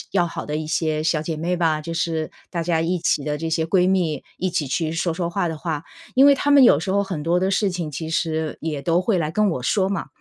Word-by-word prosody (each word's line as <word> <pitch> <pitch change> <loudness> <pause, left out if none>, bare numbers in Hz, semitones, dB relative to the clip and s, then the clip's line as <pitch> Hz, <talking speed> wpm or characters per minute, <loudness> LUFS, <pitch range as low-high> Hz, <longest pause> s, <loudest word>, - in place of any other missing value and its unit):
要 180 -3 +2
好 165 - -6
的 150 0 -2
一 155 0 -4
些 155 -1 0
小 160 -1 +1
姐 160 0 -4
妹 170 +3 -1
吧， 160 -3 +1
就 165 - -5
是 165 -1 -2 0.2
大 170 -2 -3
家 165 -1 +1
一 175 +2 0
起 150 - +1
的 150 -1 -1
这 160 +1 -4
些 160 0 0
闺 180 +1 +3
蜜， 170 -7 0 0.2
一 185 - 0
起 165 -5 -1
去 155 +4 -1
说 170 +1 -1
说 170 +1 -2
话 180 +1 -1
的 160 -2 -4
话 160 -2 -3 0.3
因 265 - +6
为 285 0 +8
她 290 +1 -1
们 280 -2 +7
有 150 -11 +6
时 180 - -3
候 200 +1 +2
很 175 -6 -4
多 170 +3 +2
的 190 +1 +1
事 200 +1 +2
情 175 -4 -4
其 160 +3 -5
实 160 -1 -1
也 155 -3 -3
都 170 +5 +1
会 195 -2 +1
来 155 -2 -1
跟 210 +3 +2
我 130 - -3
说 190 +7 +1
嘛。 195 -3 -2
165 Hz, 295 characters per minute, -22 LUFS, 155-180 Hz, 0.3 s, 为